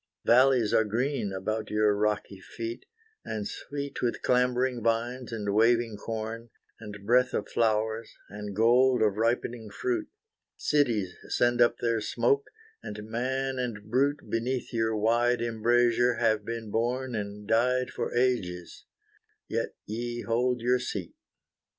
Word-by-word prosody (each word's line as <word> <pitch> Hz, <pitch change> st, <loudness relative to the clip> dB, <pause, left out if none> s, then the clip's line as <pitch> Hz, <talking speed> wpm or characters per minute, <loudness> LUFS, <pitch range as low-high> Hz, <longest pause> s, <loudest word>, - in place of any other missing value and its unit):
Vallies 125 Hz, -2 st, +5 dB
are 110 Hz, -, +5 dB
green 115 Hz, 0 st, -1 dB
about 110 Hz, +3 st, -3 dB
your 105 Hz, -1 st, +3 dB
rocky 105 Hz, -2 st, -1 dB
feet, 115 Hz, +4 st, -7 dB, 0.4 s
And 105 Hz, -2 st, -4 dB
sweet 140 Hz, -1 st, -6 dB
with 120 Hz, -1 st, -1 dB
clambering 125 Hz, 0 st, +2 dB
vines, 120 Hz, +2 st, -1 dB
and 105 Hz, -3 st, -2 dB
waving 115 Hz, +1 st, +3 dB
corn, 115 Hz, +2 st, -5 dB, 0.3 s
And 105 Hz, -2 st, -9 dB
breath 125 Hz, +3 st, +3 dB
of 105 Hz, -, -2 dB
flowers, 110 Hz, 0 st, 0 dB, 0.2 s
and 105 Hz, -1 st, -7 dB
gold 120 Hz, +2 st, +4 dB
of 105 Hz, -2 st, +1 dB
ripening 115 Hz, 0 st, -1 dB
fruit; 350 Hz, -, -2 dB, 0.5 s
Cities 115 Hz, -11 st, +1 dB, 0.2 s
send 120 Hz, 0 st, +2 dB
up 120 Hz, 0 st, +4 dB
their 115 Hz, -2 st, 0 dB
smoke, 425 Hz, -, +1 dB, 0.3 s
and 105 Hz, +1 st, -8 dB
man 130 Hz, +2 st, -1 dB
and 110 Hz, -4 st, -4 dB
brute 140 Hz, +4 st, +1 dB
Beneath 125 Hz, +3 st, -2 dB
your 110 Hz, -1 st, 0 dB
wide 120 Hz, +3 st, +2 dB
embrazure 120 Hz, +1 st, +2 dB
have 110 Hz, -3 st, +2 dB
been 115 Hz, -1 st, -5 dB
born 125 Hz, +3 st, -1 dB
And 105 Hz, -1 st, -5 dB
died 125 Hz, +3 st, +2 dB
for -, -, -3 dB
ages, 95 Hz, -9 st, -1 dB, 0.6 s
yet -, -, -2 dB
Ye 120 Hz, +2 st, -4 dB
hold 125 Hz, +1 st, 0 dB
your 125 Hz, +1 st, +2 dB
seat. 100 Hz, -8 st, -5 dB
115 Hz, 135 wpm, -28 LUFS, 110-125 Hz, 0.6 s, Vallies